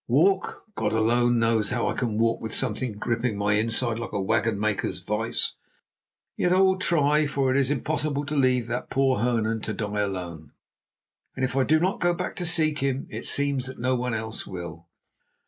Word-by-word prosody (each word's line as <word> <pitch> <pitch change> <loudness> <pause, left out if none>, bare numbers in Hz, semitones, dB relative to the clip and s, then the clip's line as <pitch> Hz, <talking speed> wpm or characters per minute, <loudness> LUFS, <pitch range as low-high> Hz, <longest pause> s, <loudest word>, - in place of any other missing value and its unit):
"Walk! 185 +10 +2
God - - -1
alone 120 +2 +3
knows 115 -2 +2
how 120 -1 0
I - - 0
can 115 -4 -2
walk 115 +1 +1
with 110 -1 -2
something 125 -1 0
gripping 115 +1 -2
my 105 0 +1
inside 115 +2 +1
like 115 - -6
a 100 - -1
wagon 105 +2 +1
maker's 105 -3 -1
vice. 105 +5 -1 0.8
Yet 180 - +1
I 185 - +4
will 190 -1 +4
try, 150 -3 +2
for 135 -2 0
it - - +1
is 135 -2 +2
impossible 145 0 -1
to 150 +1 -3
leave 130 -3 +2
that 120 +2 -4
poor 135 -2 +2
Hernan 115 -1 0
to 110 - -3
die 105 0 -3
alone; 90 -6 -4 0.8
and 130 - 0
if 125 0 -4
I 135 - +3
do 155 +1 +4
not 185 +4 0
go 175 -1 +2
to 180 0 -4
seek 155 -2 +2
him, 135 -1 -1
it - - -4
seems 140 -2 +1
that 130 - -8
no 130 +2 0
one 125 -2 -1
else 110 0 -5
will." 85 -3 -8
120 Hz, 195 wpm, -25 LUFS, 110-140 Hz, 0.8 s, I